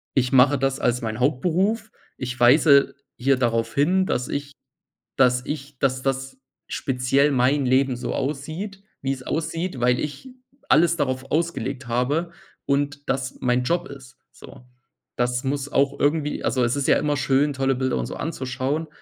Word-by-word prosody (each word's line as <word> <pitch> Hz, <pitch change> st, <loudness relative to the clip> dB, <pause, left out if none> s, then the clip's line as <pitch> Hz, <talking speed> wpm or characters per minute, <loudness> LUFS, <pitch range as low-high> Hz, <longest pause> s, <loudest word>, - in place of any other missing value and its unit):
ich 125 Hz, -2 st, +2 dB
mache 135 Hz, +2 st, +5 dB
das 135 Hz, 0 st, 0 dB
als 125 Hz, 0 st, +1 dB
mein 110 Hz, -1 st, -4 dB
Hauptberuf. 185 Hz, -, +1 dB, 0.3 s
Ich 125 Hz, -1 st, -5 dB
weise 140 Hz, +3 st, +5 dB, 0.2 s
hier 135 Hz, +2 st, +2 dB
darauf 115 Hz, -2 st, 0 dB
hin, 180 Hz, +7 st, +3 dB
dass 125 Hz, -8 st, -1 dB
ich 140 Hz, 0 st, -4 dB, 0.7 s
dass 125 Hz, -1 st, +3 dB
ich 145 Hz, -2 st, -6 dB
dass 130 Hz, -1 st, +1 dB
das 135 Hz, 0 st, -2 dB, 0.3 s
speziell 135 Hz, +2 st, +1 dB
mein 135 Hz, +2 st, +2 dB
Leben 130 Hz, 0 st, +2 dB
so 125 Hz, 0 st, -4 dB
aussieht, 155 Hz, +9 st, -4 dB, 0.2 s
wie 135 Hz, -, -1 dB
es 130 Hz, -1 st, -9 dB
aussieht, 165 Hz, +1 st, -3 dB
weil 125 Hz, 0 st, +3 dB
ich 150 Hz, -, -5 dB, 0.4 s
alles 170 Hz, +2 st, +5 dB
darauf 130 Hz, -3 st, -2 dB
ausgelegt 140 Hz, -5 st, -2 dB
habe 145 Hz, +8 st, 0 dB, 0.3 s
und 145 Hz, +1 st, -1 dB
das 130 Hz, 0 st, -2 dB
mein 125 Hz, 0 st, +1 dB
Job 175 Hz, +6 st, 0 dB
ist“, 135 Hz, -1 st, -12 dB
so. 125 Hz, -, -14 dB, 0.5 s
Das 125 Hz, 0 st, 0 dB
muss 140 Hz, +1 st, -2 dB
auch 140 Hz, 0 st, +1 dB
irgendwie 150 Hz, 0 st, 0 dB
also 130 Hz, -2 st, +1 dB
es 120 Hz, +2 st, +1 dB
ist 140 Hz, -1 st, -1 dB
ja -, -, +5 dB
immer 145 Hz, 0 st, 0 dB
schön, 140 Hz, +2 st, +2 dB
tolle 135 Hz, 0 st, +1 dB
Bilder 130 Hz, 0 st, -1 dB
und -, -, -2 dB
so -, -, -6 dB
anzuschauen, 135 Hz, +1 st, -3 dB
135 Hz, 165 wpm, -23 LUFS, 130-150 Hz, 0.7 s, mache